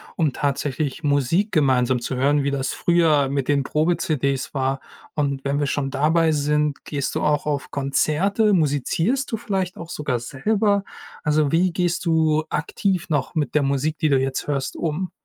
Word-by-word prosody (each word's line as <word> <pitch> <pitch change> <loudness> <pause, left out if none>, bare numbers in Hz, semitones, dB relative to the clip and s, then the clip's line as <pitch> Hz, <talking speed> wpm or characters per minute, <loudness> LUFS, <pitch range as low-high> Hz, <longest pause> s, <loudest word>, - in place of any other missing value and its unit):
um 155 -5 +1
tatsächlich 140 +1 -2
Musik 145 - +1
gemeinsam 130 -4 +2
zu 130 - -4
hören, 140 +2 +2
wie 140 - 0
das 135 -2 -1
früher 160 -5 +3
mit 140 -2 -1
den 140 -1 +2
Probe-CDs 150 -3 0
war? 135 -1 -1 0.4
Und 140 -2 -1
wenn 140 +1 0
wir 145 - 0
schon 140 -1 -1
dabei 160 +4 +2
sind, 150 0 0
gehst 140 -3 -3
du - - 0
auch 150 -1 +1
auf 145 -2 -2
Konzerte, 165 +10 +1
musizierst 165 - +1
du - - +1
vielleicht 190 -5 -2
auch 165 - -9
sogar 140 -7 -2
selber? 200 - 0 0.4
Also, 150 -2 +2
wie 175 +1 +2
gehst 175 -1 -1
du 160 -1 +2
aktiv 185 +4 -1
noch 145 +2 -1
mit 145 -6 -1
der 150 - +3
Musik, 140 +3 0
die 155 - +2
du 135 - +4
jetzt 135 +1 -2
hörst, 135 -2 -2
um? 170 +3 -2
150 Hz, 175 wpm, -22 LUFS, 140-165 Hz, 0.4 s, du